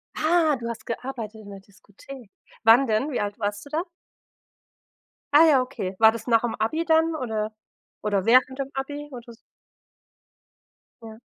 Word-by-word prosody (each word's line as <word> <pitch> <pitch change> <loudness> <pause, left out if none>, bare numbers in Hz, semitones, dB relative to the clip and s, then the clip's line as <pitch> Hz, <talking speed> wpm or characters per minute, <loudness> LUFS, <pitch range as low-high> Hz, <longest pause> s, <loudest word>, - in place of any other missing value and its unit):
Ah, 315 -2 +2
du 235 - -6
hast 235 - -7
gearbeitet 230 -3 -6
in 205 - -12
der 195 - -9
Diskothek. 205 +5 -15 0.3
Wann 230 +4 +6
denn? 225 +7 0
Wie 255 - -2
alt 205 +2 -4
warst 205 -1 -3
du - - -13
da? 310 +3 -1 1.5
Ah 305 +3 +8
ja, 280 -5 +5
okay. 205 -7 -5
War 220 +1 +6
das 230 +2 -8
nach 230 -2 +4
dem 240 -2 -2
Abi 310 +10 -1
dann 325 0 +2
oder 220 -6 -3 0.5
oder 200 -3 -1
während 255 +3 +3
dem 275 -1 -3
Abi 290 +2 -5
oder 240 -1 -10
s 230 0 -14 1.6
Ja. 220 -1 -12
235 Hz, 165 wpm, -24 LUFS, 215-275 Hz, 1.6 s, Ah